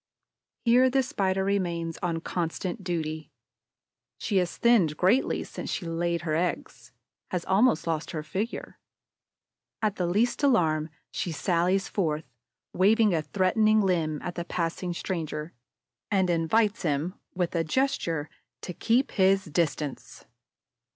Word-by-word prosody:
Here 250 +2 +5
the 265 +1 +2
Spider 195 -8 0
remains 170 -4 -1
on 170 -2 -1
constant 175 +4 -3
duty. 160 -3 -3 0.9
She 200 - -1
has 180 -2 0
thinned 195 -11 +3
greatly 195 +9 +2
since - - -7
she 180 - -3
laid 170 +1 -1
her 160 -2 -1
eggs, 140 -8 -3 0.4
has 180 -2 -3
almost 195 -1 +3
lost 160 -1 -2
her 155 -2 -4
figure. 200 +9 -4 1.0
At 215 -2 0
the 180 - 0
least 220 +10 +1
alarm, 160 - +2 0.2
she 175 - -3
sallies 175 +6 +1
forth, 160 -5 -1 0.5
waves 210 +2 +4
a 160 - +1
threatening 215 +5 +2
limb 165 -6 0
at 175 - -4
the 170 - -4
passing 175 +1 -2
stranger 160 -3 -4 0.6
and 190 -3 +2
invites 205 +6 +2
him, 155 +1 -1 0.2
with 180 -2 -1
a 165 -2 +1
gesture, 165 - 0 0.3
to 180 - -6
keep 240 +9 +1
his 195 0 +3
distance. 150 -3 -2
180 Hz, 130 wpm, -27 LUFS, 165-200 Hz, 1.0 s, Here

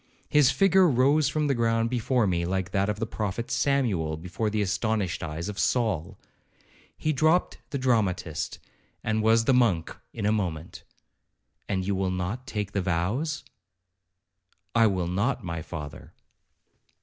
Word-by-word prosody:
His 150 -3 +5
figure 190 -2 +4
rose 140 +3 +3
from 155 -1 0
the 140 - +2
ground 115 -1 +1
before 125 -1 +1
me 85 -3 0
like 95 +1 -2
that 100 +1 +1
of 105 - -1
the 115 - -2
Prophet 110 0 -4
Samuel 105 - +1
before 90 +6 -3
the 105 0 0
astonished 100 -2 -1
eyes 80 +2 -4
of 105 -2 -5
Saul. 105 -10 0 0.8
He 155 - 0
dropt 155 +5 +2
the 140 - -2
dramatist, 105 - 0 0.5
and 110 0 0
was 115 +1 +4
the 135 - +4
monk 105 -10 +2 0.2
in - - -4
a 105 - +3
moment. 90 -7 -3 0.9
'And 95 -2 -1
you 100 - 0
will 95 0 0
not 95 +8 -3
take 105 -2 -3
the 100 - -1
vows?' 100 - -1 1.3
'I 115 -1 +5
will 95 -4 0
not, 100 +9 0
my 85 -2 -4
father.' 75 -3 -8
105 Hz, 150 wpm, -27 LUFS, 90-125 Hz, 1.3 s, His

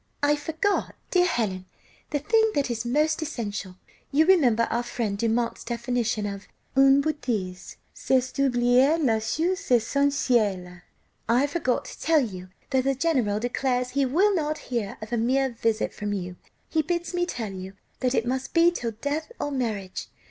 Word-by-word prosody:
"I 290 +1 +4
forgot, 320 +7 -1 0.2
dear 360 -1 +4
Helen, 205 - -1 0.4
the 295 - 0
thing 445 +9 +2
that 280 -3 +1
is 235 0 -3
most 305 +5 +1
essential, 210 -11 -4 0.4
(you 310 +3 +4
remember 265 -12 +4
our 235 - +1
friend 235 -4 -3
Dumont's 230 +2 -1
definition 235 -2 -1
of 200 -1 -6 0.3
une 270 +1 +6
betîse: 215 -12 -3 0.2
c'est 260 -1 0
d'oublier 255 +2 +3
la 240 -9 +2
chose 350 - -1
essentielle;) 230 -8 +1 0.5
I 245 +4 +4
forgot 285 -4 -1
to - - -10
tell 320 -1 +4
you 185 -6 -5 0.2
that 260 -1 +2
the 270 0 +1
general 255 -9 +1
declares 250 +1 -1
he 275 0 +1
will 380 +10 +3
not 310 -3 -1
hear 220 -5 -2
of 215 - -7
a - - +2
mere 265 +4 +2
visit 225 -1 -1
from 205 0 -3
you. 180 -2 -4 0.3
He 320 - +1
bids 345 +3 -2
me 350 0 0
tell 225 - -4
you 190 0 -7 0.3
that 255 0 +1
it 225 - +1
must 260 +4 -3
be 335 +1 +6
'till 235 -9 -3
death 300 +7 -2
or 290 - -2
marriage. 215 -8 -3
250 Hz, 165 wpm, -26 LUFS, 225-300 Hz, 0.5 s, une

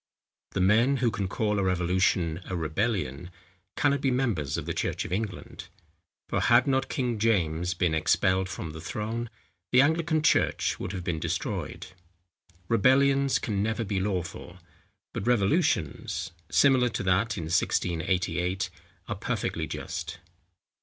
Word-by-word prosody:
The 95 - 0
men, 115 +8 +4
who 120 -2 +1
can 100 -2 -2
call 105 +2 -1
the 100 - +1
revolution 90 -2 +1
a 95 - -4
rebellion, 85 - -2 0.5
cannot 140 -1 +2
be 135 - +2
members 115 - 0
of - - -4
the - - -2
church - - -2
of - - -7
England; 105 +2 -5 0.6
for - - -1
had 120 +1 +5
not 135 -1 +1
King 120 -4 -1
James 90 -5 +1
been 85 -2 +1
expelled 95 +4 +2
from 80 -4 -5
the 80 +1 -9
throne, 110 +6 -4 0.4
the 130 +2 +6
Anglican 160 +1 +1
church - - +2
would - - -4
have 95 -3 -4
been 85 -2 -2
destroyed. - - -3 0.8
Rebellions 135 +4 +4
can 100 -3 -2
never 110 +2 -1
be 100 -2 -1
lawful; 95 -3 -3 0.6
but 105 - -4
revolutions, 100 - +1 0.2
similar 130 -3 +4
to - - -3
that 100 +4 +1
in 85 - -3
1688, 90 +2 0 0.4
are - - -2
perfectly - - -2
just. 90 0 -5
100 Hz, 140 wpm, -27 LUFS, 90-120 Hz, 0.8 s, the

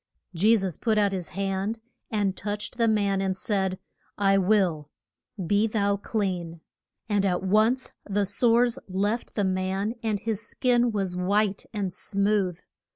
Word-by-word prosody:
] - - -53
Je 225 +3 +6
sus 190 -5 -3
put 220 -2 +1
out 205 -1 +3
his 185 -3 -4
hand 195 +3 -2 0.3
and 205 -3 0
touched 210 +4 -5
the 230 - +4
man, 200 -3 +2
and 190 -1 -1
said, 190 -3 -1 0.4
I 195 -1 +3
will: 180 -7 +2 0.6
be 205 +5 +3
thou 200 -2 +1
clean. 180 -6 -3 0.5
And 205 -2 +1
at 185 -2 0
once 215 +7 +2 0.2
the 200 0 +1
sores 235 +4 +2
left 205 +5 -1
the 205 - +1
man 190 +3 -1
and 215 -3 -1
his 220 0 -2
skin 240 +2 +1
was 195 -4 -1
white 200 +2 0
and 200 -4 -3
smooth. 200 -2 0
200 Hz, 155 wpm, -26 LUFS, 190-215 Hz, 0.6 s, Je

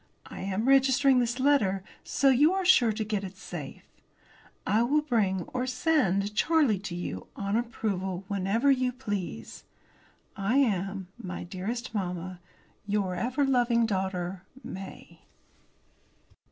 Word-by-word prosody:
I - - -9
am 195 +5 -2
registering 270 0 +5
this 240 +1 -1
letter, 215 -9 +2 0.2
so 275 - +2
you 290 +7 +5
are 385 -1 -1
sure 245 -11 +5
to 215 +1 -2
get 210 -2 -2
it 190 -1 -8
safe. 165 -7 -8 0.8
I 215 +3 +2
will 290 +6 +2
bring, 205 - +1
or 255 0 -1
send, 210 - +1
Charlie 285 - +3
to 190 -3 -6
you, 95 - -5
on 200 +1 -2
approval, 195 -6 -2
whenever 200 +7 +1
you 255 -1 +2
please. 205 -8 -5 0.7
I 200 +6 0
am, 195 -7 0
my 185 -6 -6
dearest 205 +7 -5
mamma, 180 -2 -4 0.5
Your 200 -3 0
ever 250 +10 0
loving 240 -3 +3
daughter, 190 -3 -2 0.2
MAY. 190 0 -9
210 Hz, 130 wpm, -28 LUFS, 190-255 Hz, 0.8 s, registering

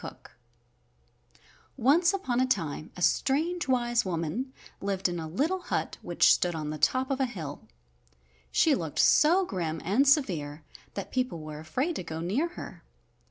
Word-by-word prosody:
COOKE - - -10 1.5
Once 295 +9 +4
upon 320 -12 -1
a 255 - +3
time 160 - -2
a 180 - -3
strange, 315 - +1
wise 240 -2 +2
woman 185 - -3 0.3
lived 195 -1 0
in 175 -1 -3
a 160 - -5
little 300 - 0
hut 355 - -3
which - - +4
stood 175 -1 0
on 155 -1 -3
the 155 - -5
top 260 - +2
of 270 - -1
a 265 - +2
hill. 160 -11 -7 0.8
She 315 - +4
looked 165 - -3
so 355 +5 +5
grim 165 - -3
and 230 +11 +3
severe 165 - +1 0.3
that 200 - -5
people 250 -10 -1
were 155 -1 -7
afraid 260 - -2
to - - -4
go 160 -1 -6
near 205 - 0
her. - - -9
220 Hz, 160 wpm, -28 LUFS, 165-275 Hz, 1.5 s, so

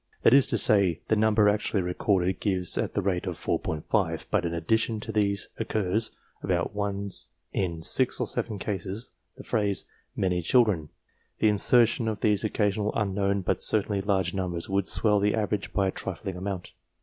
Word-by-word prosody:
That - - +6
is 135 -1 +6
to - - +1
say, 100 -7 +3
the 110 - +4
number 110 0 +3
actually 105 -1 +1
recorded 90 0 0
gives 95 -4 -1
at - - -2
the 100 - 0
rate 90 -2 -1
of - - -3
4J, 80 +1 -1
but 100 -5 +1
in - - -4
addition 110 +7 0
to 110 +1 -6
these 100 -1 0
occurs, 110 -1 -1 0.3
about 85 0 -1
once 100 -1 -3 0.2
in 85 -4 -2
6 - - +4
or - - 0
7 110 -3 -2
cases, 100 +3 -4 0.3
the - - -10
phrase 105 -4 0 0.2
" - - -45
many 90 -2 0
children." 95 - +2 0.5
The 110 - +3
insertion 115 +2 +3
of 110 -1 -3
these 105 -1 +2
occasional 105 -1 0
unknown, 100 -1 0
but 95 - -1
certainly 105 -2 +1
large 95 -3 0
numbers, 90 -3 -3
would 100 0 0
swell 105 -2 +2
the 105 +1 +1
average 105 -2 -2
by 95 -2 +1
a - - -2
trifling 95 0 -5
amount. 95 -1 -5
100 Hz, 175 wpm, -27 LUFS, 95-105 Hz, 0.5 s, That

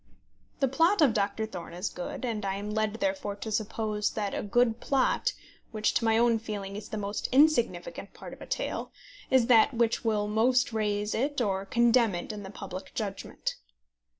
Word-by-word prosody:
The 270 - +4
plot 330 +10 +3
of 285 -8 +5
Doctor 205 +1 0
Thorne 180 -5 -8
is 180 +3 -2
good, 180 +7 -5
and 225 -3 -2
I 195 -1 -1
am 205 +1 -5
led 215 0 0
therefore 285 -5 -2
to 220 +2 -6
suppose 215 0 -1
that 205 -2 -2
a - - -2
good 230 +2 +2
plot, 275 - +1 0.4
which, 215 -1 0
to 230 - +1
my 225 0 +4
own 230 -1 +3
feeling, 205 -3 -5
is 210 0 -7
the 215 - -4
most 205 0 -3
insignificant 300 - +2
part - - -9
of - - -13
a - - -9
tale, - - -3 0.4
is 260 -3 +4
that 235 +2 +5
which 230 -1 +1
will 210 -2 +1
most 240 +3 +2
raise 210 -1 0
it 280 +4 0
or 200 -5 +1
most - - -28
condemn 235 -3 +4
it 175 - -4
in 210 -1 -6
the 190 - -8
public 190 -1 -8
judgment. 200 -3 -4
220 Hz, 195 wpm, -29 LUFS, 205-245 Hz, 0.4 s, of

